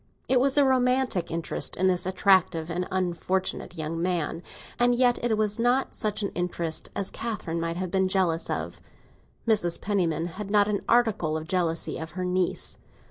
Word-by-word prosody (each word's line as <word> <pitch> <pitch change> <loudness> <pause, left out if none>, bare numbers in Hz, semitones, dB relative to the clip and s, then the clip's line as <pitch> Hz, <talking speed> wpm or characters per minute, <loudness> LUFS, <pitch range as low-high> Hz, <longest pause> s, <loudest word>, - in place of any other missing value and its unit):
It 260 - +4
was 270 +2 +2
a 285 - +6
romantic 255 -7 +2
interest 165 0 -2
in 185 - 0
this 180 -1 +2
attractive 185 -3 +2
and 180 +2 -2
unfortunate 185 0 -2
young 160 +1 -3
man, 170 -2 -1 0.4
and 245 0 +4
yet 245 -1 +2
it 230 -3 +1
was 215 0 0
not 245 +3 +1
such 215 -2 -2
an 200 - 0
interest 170 -2 -3
as 200 - -2
Catherine 190 -8 -4
might 165 0 -2
have 185 -1 -3
been 190 0 +2
jealous 185 -4 0
of. - - -4 0.7
Mrs. 175 -7 +3
Penniman 175 -5 0
had 195 +4 -6
not 205 0 +4
a 205 -1 -1
particle 220 -10 +2
of 160 0 -7
jealousy 170 -2 -1
of 160 0 -7
her 185 - -1
niece. 180 0 -1
185 Hz, 175 wpm, -26 LUFS, 170-215 Hz, 0.7 s, a